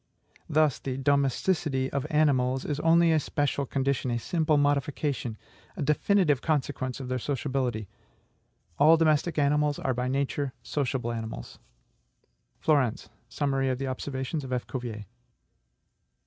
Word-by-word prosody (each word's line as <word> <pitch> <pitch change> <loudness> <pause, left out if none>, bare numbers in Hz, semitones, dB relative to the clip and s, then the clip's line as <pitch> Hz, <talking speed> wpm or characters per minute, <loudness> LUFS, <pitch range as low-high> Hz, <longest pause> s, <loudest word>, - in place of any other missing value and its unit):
Thus, 150 -5 +3
the 130 -1 -4
DOMESTICITY 140 0 +1
of 140 +1 -2
animals 135 -5 +2
is 145 -1 -2
only 165 +1 +4
a 160 - +4
special 140 -1 -1
condition, 135 -1 0
a 120 - 0
simple 155 +4 +1
modification, 145 -4 0 0.4
a - - -2
definitive 150 0 +2
consequence 130 -4 -1
of 130 - -6
their 130 0 -1
SOCIABILITY. 130 -5 -2 0.9
All 160 +3 +7
domestic 155 +1 +2
animals 145 0 +2
are 130 - -1
by 125 +1 -2
nature 140 0 -1
sociable 130 -4 -2
animals."... 115 - -6 1.0
Flourens: 140 -7 +1 0.2
Summary 135 -2 0
of 130 - 0
the 135 - -3
Observations 130 +3 -3
of 130 - -7
F. 125 -1 -1
Cuvier. 115 -5 -5
140 Hz, 130 wpm, -28 LUFS, 130-150 Hz, 1.0 s, All